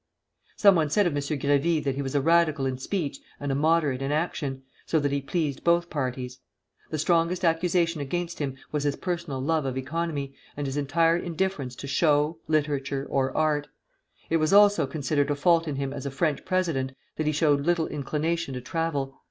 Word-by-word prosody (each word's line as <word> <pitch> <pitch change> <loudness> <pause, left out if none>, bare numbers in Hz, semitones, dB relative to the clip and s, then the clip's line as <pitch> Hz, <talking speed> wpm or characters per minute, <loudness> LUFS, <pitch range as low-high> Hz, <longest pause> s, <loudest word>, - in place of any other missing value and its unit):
Some 200 -2 +7
one 160 -4 +2
said 205 +7 +3
of 175 - +1
M. 145 - -1
Grévy 145 +2 +1
that 135 - 0
he 140 - -3
was 135 0 -4
a 140 - +3
Radical 160 -2 +3
in 130 -1 -2
speech 145 -3 -3 0.2
and 145 -1 -2
a - - +1
Moderate 150 -2 +2
in 135 +1 -1
action, 145 -4 -2 0.2
so 160 - +2
that 145 -1 0
he 140 0 0
pleased 145 -1 -2
both 170 0 +2
parties. 130 -3 -3 0.5
The 155 - -2
strongest 170 +3 +1
accusation 170 -1 +1
against 170 +5 -3
him 140 -3 -2 0.2
was 150 -1 -1
his 145 -1 0
personal 170 -7 -3
love 155 +3 +1
of 130 -1 -3
economy, 145 0 -3 0.2
and 145 - -2
his 135 0 -3
entire 165 +4 +2
indifference 170 -7 -2
to 140 - -8
show, 150 +2 +2
literature, 145 -3 0
or 135 -1 +1
art. 150 -2 +1 0.6
It 165 - +2
was 155 +3 +1
also 205 -7 +6
considered 145 0 0
a 145 - +1
fault 165 +3 +3
in 150 - -2
him 135 0 -3
as 140 0 -5
a - - -1
French 145 +1 -1
president 165 -9 0 0.2
that 155 - -1
he - - +3
showed 145 -2 +2
little 175 -2 +2
inclination 150 +1 -2
to 125 - -4
travel. 140 -1 -2
150 Hz, 195 wpm, -26 LUFS, 140-165 Hz, 0.6 s, Some